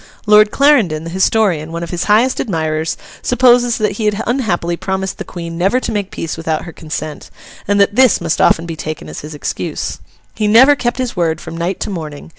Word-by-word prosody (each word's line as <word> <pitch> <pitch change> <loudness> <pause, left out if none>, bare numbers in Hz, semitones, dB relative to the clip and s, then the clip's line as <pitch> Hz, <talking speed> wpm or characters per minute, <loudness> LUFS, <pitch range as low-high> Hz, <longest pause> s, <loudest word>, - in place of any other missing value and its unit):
Lord 210 0 +6
Clarendon, 225 - +3
the 165 - -7
historian, 190 -4 +1
one 170 +1 -4
of 170 - -6
his 175 -1 -2
highest 225 +5 +3
admirers, 160 -4 -2 0.2
supposes 245 -1 +3
that 215 -2 0
he 220 - -2
had 210 0 +1
unhappily 200 -9 -1
promised 190 +1 -3
the - - -3
Queen 170 -1 -7
never 195 +8 +2
to 235 - -4
make 205 -3 -2
peace 165 -5 -5
without 160 -1 -2
her 170 - -9
consent, 155 -1 -6 0.4
and 205 +1 +2
that 200 +1 +3
this 255 0 +5
must 165 -1 -1
often 165 - +3
be 165 -1 -5
taken 155 0 -6
as - - -7
his 150 +1 -8
excuse. 145 - -4 0.3
He 215 - -1
never 260 +7 +7
kept 240 -3 -2
his 255 -2 -3
word 165 -3 0
from - - -8
night 170 +3 -2
to - - -3
morning. 155 -5 -7
190 Hz, 210 wpm, -16 LUFS, 165-225 Hz, 0.4 s, never